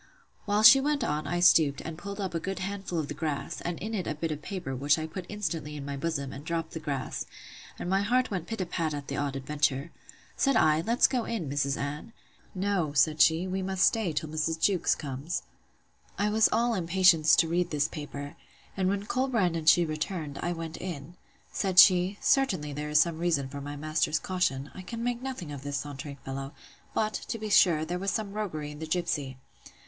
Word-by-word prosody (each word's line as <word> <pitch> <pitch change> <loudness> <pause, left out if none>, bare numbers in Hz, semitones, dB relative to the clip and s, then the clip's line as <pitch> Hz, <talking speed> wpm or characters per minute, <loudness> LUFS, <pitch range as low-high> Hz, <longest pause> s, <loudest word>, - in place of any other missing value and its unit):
While 205 0 +1
she 265 +5 +10
went 290 -1 0
on, 150 -5 -1
I 175 0 -1
stooped, 155 -5 +5
and 160 - -6
pulled 200 +4 -7
up 190 -3 -3
a 165 - -1
good 195 +3 -4
handful 195 -1 -4
of 155 -3 -1
the - - -5
grass, 150 -2 -4
and 175 -1 -3
in 215 +3 -5
it 190 -5 -2
a 155 - -2
bit 160 +1 -3
of 150 -1 -4
paper, 175 -6 -5
which 145 +4 +2
I 155 - -3
put 175 +3 -7
instantly 165 -7 -3
in 140 -2 -6
my 140 0 -4
bosom, 140 -2 -3
and 140 - -8
dropt 165 0 -3
the 160 - -5
grass: 140 -4 -4 0.5
and - - -5
my 190 +2 +2
heart 250 +4 +1
went 180 -4 -3
pit 225 -3 -4
a - - -1
pat 165 -3 -2
at 145 -1 -7
the 140 - -3
odd 140 -1 -2
adventure. 145 +2 -1 0.4
Said 275 -2 +2
I, 155 -5 +4
Let's 230 +7 +3
go 250 -4 +1
in, 215 -10 -3
Mrs. 140 0 0
Anne. 150 +10 -5 0.4
No, 185 -6 0
said 155 +2 +3
she, 165 +3 +5
we 190 +1 -2
must 190 0 +2
stay 220 -7 +1
till 155 0 -3
Mrs. 155 +1 -1
Jewkes 185 0 +2
comes. 140 +3 -4 0.7
I 210 +1 +1
was 220 +1 +4
all 235 +1 +2
impatience 180 -4 +4
to 165 - +3
read 175 +1 0
this 150 -2 +1
paper: 145 -1 -7 0.4
and 185 -1 +1
when 200 +1 -1
Colbrand 230 -8 +1
and 160 -1 +3
she 175 +2 +5
returned, 155 -1 -4
I 175 - -1
went 165 -1 -5
in. 170 -2 -7 0.4
Said 190 -3 -2
she, 185 +2 +7
Certainly 185 - +1
there 150 +1 -4
is 150 0 +4
some 165 0 +2
reason 160 -6 0
for 140 +1 -7
my 145 +1 -6
master's 155 +1 0
caution: 150 -7 -1
I 190 - -8
can 230 +5 -6
make 245 0 -1
nothing 255 - -5
of 140 -2 -7
this 145 0 -3
sauntering 140 0 -6
fellow; 135 +2 -5 0.4
but, 215 0 +1
to - - -3
be 215 -1 -5
sure, 160 -6 +5
there 175 +2 -3
was 195 +1 -1
some 205 -1 -2
roguery 155 -9 -4
in 150 - -10
the 160 - -5
gipsy. 155 -6 -2
165 Hz, 215 wpm, -28 LUFS, 150-195 Hz, 0.7 s, she